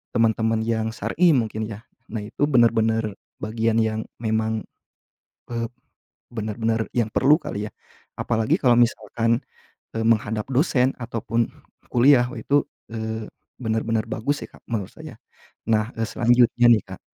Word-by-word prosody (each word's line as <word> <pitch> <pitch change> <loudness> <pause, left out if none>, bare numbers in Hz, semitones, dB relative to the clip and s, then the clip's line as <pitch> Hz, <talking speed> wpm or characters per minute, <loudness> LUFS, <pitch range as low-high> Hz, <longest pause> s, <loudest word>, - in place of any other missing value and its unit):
teman-teman 110 -1 +2
yang 110 -1 0
syar'i 160 - +3
mungkin, 110 -3 -1
ya? 110 -1 -8 0.3
Nah, 110 - -2
itu 145 +7 0
benar-benar 115 -3 +3 0.3
bagian 110 +1 0
yang 110 0 -1 0.2
memang, 110 -1 0 0.9
eee, 115 -1 -2 0.6
benar-benar 110 0 -1
yang 115 -3 +1
perlu 140 +4 +5
kali, 105 +1 -4
ya? - - -47 0.5
Apalagi 115 -2 +1
kalau 120 -2 +5
misalkan, 115 0 +1 0.5
e 115 - -1
menghadap 110 -1 +1
dosen 130 -1 +3
ataupun 115 -1 -1 0.5
kuliah, 125 0 +6
oh, - - -8
itu, 145 +1 +1 0.3
eee, 110 -1 -4 0.3
benar-benar 110 -1 0
bagus, 140 +6 -1
ya, - - -9
Kak, - - -17
menurut 105 -5 -3
saya. - - -10 0.6
Nah, 110 +1 +2
e 115 - -2
selanjutnya, 120 +1 +3
nih, 110 -4 +5
Kak, - - -9
115 Hz, 135 wpm, -23 LUFS, 110-120 Hz, 0.9 s, kuliah